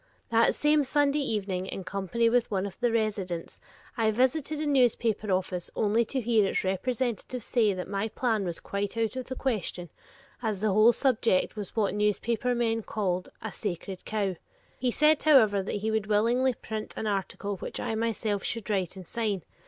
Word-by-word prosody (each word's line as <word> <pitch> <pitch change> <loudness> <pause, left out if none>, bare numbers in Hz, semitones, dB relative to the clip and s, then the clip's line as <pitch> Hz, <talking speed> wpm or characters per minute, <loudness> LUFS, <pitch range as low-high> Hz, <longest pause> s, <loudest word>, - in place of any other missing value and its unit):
That 230 0 +4
same 300 0 +3
Sunday 285 +2 +2
evening, 195 -8 -2
in 190 - -5
company 195 +4 0
with 240 +1 +2
one 195 -2 -1
of 195 -2 -6
the 240 -1 +2
residents, 200 -6 -2 0.4
I 225 -3 +2
visited 275 +6 +1
a 310 - -1
newspaper 235 -6 +2
office 185 -1 -1
only 220 +2 +2
to 265 +4 -2
hear 230 -3 +3
its - - 0
representative 240 +5 -2
say 220 -6 +2
that 180 - -5
my 200 +2 -1
plan 225 -2 0
was 170 -3 -3
quite 200 +2 -3
out 225 -1 0
of 255 -1 -4
the 260 - -4
question, 195 - -2 0.5
as 215 -5 -1
the 215 -2 +2
whole 215 +3 +7
subject 230 -8 +1
was 205 -3 -6
what 210 -3 +1
newspaper 220 +4 0
men 225 -1 +1
called 185 -4 -2
"a 220 - -4
sacred 190 -1 -5
cow." 200 -4 -1 0.4
He 255 - +1
said, 305 +4 +3
however, 220 -10 +5
that 190 - -4
he 215 +2 -1
would 220 -1 0
willingly 235 +5 +2
print 215 -1 -6
an - - -3
article 200 0 -2
which - - -5
I - - -2
myself 220 -2 -1
should 230 -2 -3
write 190 -3 -1
and 185 -3 -10
sign. 210 -6 -2
220 Hz, 185 wpm, -28 LUFS, 195-240 Hz, 0.5 s, whole